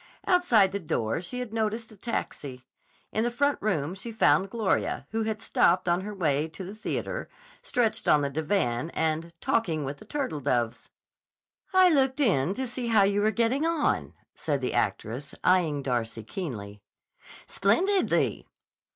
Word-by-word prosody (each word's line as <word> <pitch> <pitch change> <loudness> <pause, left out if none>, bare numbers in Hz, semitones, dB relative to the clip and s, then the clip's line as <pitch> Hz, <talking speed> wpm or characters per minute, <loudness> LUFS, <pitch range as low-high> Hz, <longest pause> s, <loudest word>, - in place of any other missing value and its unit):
Outside 240 - +4
the 200 - -2
door 155 - -1
she 185 +8 -6
had 235 -3 -6
noticed 225 0 -2
a - - -12
taxi. 145 - -5 0.5
In 220 - 0
the 240 - +1
front 285 +4 +1
room 175 -6 0
she 195 +5 -7
found 195 -4 +3
Gloria, 220 -2 0
who 225 +1 -1
had 220 0 -3
stopped 180 -3 +3
on 175 +1 +2
her 210 +2 -5
way 155 -6 0
to 165 +4 -8
the 190 +2 -7
theater, 220 - -4 0.3
stretched 225 -3 0
on 150 - +5
the 140 - 0
divan 155 -4 0
and 160 +1 -1
talking 175 - 0
with 140 +1 -5
the - - -14
turtledoves. 145 - -2 0.8
"I 370 -1 +6
looked 265 -1 +2
in 190 - +2
to 260 - -2
see 245 0 -4
how 220 -3 +5
you 200 +1 +2
were 215 - +3
getting 235 +6 +1
on," 330 -2 0 0.2
said 145 -3 -2
the 130 - -2
actress, 120 +5 -2
eyeing 165 -6 +2
Darcy 115 -3 -2
keenly. 105 - -6 0.6
"Splendidly!" 365 - +1
195 Hz, 160 wpm, -27 LUFS, 145-230 Hz, 0.8 s, I